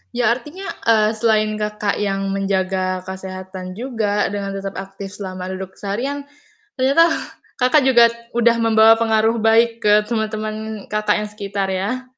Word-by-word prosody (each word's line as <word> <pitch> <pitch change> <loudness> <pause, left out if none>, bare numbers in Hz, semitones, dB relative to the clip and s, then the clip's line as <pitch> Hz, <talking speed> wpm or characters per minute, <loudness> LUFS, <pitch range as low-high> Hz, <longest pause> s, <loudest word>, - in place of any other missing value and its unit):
Ya, 240 -2 +3
artinya, 300 +11 -5 0.2
eee, 215 -1 +4
selain 215 -1 +2
Kakak 210 -1 -2
yang 195 -1 -1
menjaga 190 -1 -1
kesehatan 185 0 -7
juga 220 -4 -1
dengan 200 -1 -4
tetap 195 0 -5
aktif 195 0 -8
selama 185 -2 -6
duduk 190 0 -7
seharian, 255 +8 -3 0.6
ternyata 280 +6 +4 0.5
Kakak 255 +4 +4
juga 240 -3 +6 0.2
udah 235 0 +3
membawa 225 -1 +5
pengaruh 225 0 +2
baik 230 +1 +3
ke 210 0 +5
temen-temen 215 -1 -4
Kakak 210 0 +1
yang 210 0 -4
sekitar, 200 -1 -3
ya. 205 +8 -3
215 Hz, 140 wpm, -20 LUFS, 195-230 Hz, 0.6 s, juga